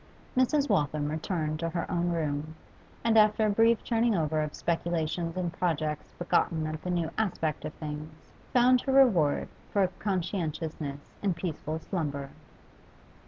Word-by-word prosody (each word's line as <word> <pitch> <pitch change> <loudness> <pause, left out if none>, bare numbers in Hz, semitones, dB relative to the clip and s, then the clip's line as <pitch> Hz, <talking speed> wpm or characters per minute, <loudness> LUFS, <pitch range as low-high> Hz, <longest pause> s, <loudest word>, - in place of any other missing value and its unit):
Mrs. 280 +3 +3
Waltham 150 - +1
returned 155 -1 -2
to 165 0 -1
her 170 0 -2
own 175 -1 +1
room, 155 -2 -2 0.5
and 225 -1 +5
after 215 +1 +4
a 210 - +3
brief 225 +1 +4
turning 230 -1 +2
over 155 -2 +1
of 150 -1 -3
speculations 170 0 -1
and 175 -2 -1
projects 155 -3 -2
begotten 165 -2 +1
of 155 0 -4
the 180 - -5
new 170 -2 0
aspect 165 -8 -1
of 150 - -5
things, 155 +1 -8 0.2
found 250 0 +5
her 270 - -1
reward 195 - +4 0.2
for 200 -2 +3
conscientiousness 160 -6 -3
in 195 -4 +1
peaceful 155 -3 -3
slumber. 145 -5 -3
165 Hz, 145 wpm, -29 LUFS, 155-200 Hz, 0.5 s, and